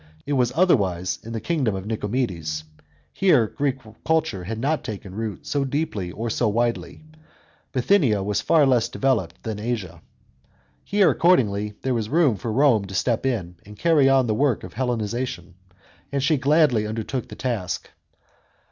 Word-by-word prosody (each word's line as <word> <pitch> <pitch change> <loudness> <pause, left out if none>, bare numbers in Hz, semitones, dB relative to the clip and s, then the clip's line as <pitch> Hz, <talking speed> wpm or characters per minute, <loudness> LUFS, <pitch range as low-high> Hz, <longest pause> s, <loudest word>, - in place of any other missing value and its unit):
It 145 - -2
was 125 -3 +2
otherwise 95 - +2
in 115 - -8
the 115 - -3
kingdom 130 - 0
of 95 0 -5
Nicomedes. 105 -8 -2 0.5
Here 180 -12 +4
Greek 135 +4 -2 0.3
culture 160 - 0
had 110 +4 -4
not 145 +7 -1
taken 100 -3 -7
root 110 -2 -5
so 145 -1 0
deeply 135 - -2
or 115 +6 -4
so 115 0 +1
widely; 120 +6 -2 0.7
Bithynia 125 - +2
was 100 0 -1
far 150 +6 +4
less 120 -3 +2
developed 120 -11 -1
than 110 -2 -4
Asia. 110 -6 -4 0.8
Here 200 -2 +3
accordingly 105 - +2
there 130 - 0
was 110 -3 -2
room 150 -6 +3
for 110 +4 -4
Rome 120 -4 +3
to 95 0 -8
*tep 120 +1 0
in 90 -9 -3
and 105 +1 -13
carry 155 -5 +4
on 135 -1 +4
the 110 - 0
work 130 0 +1
of - - -9
Hellenisation; 120 -6 -3 0.6
and 140 -1 -1
she 155 +2 +3
gladly 140 -6 +3
undertook 115 +3 -4
the - - -10
task. 115 -8 -3
115 Hz, 160 wpm, -23 LUFS, 105-135 Hz, 0.8 s, Here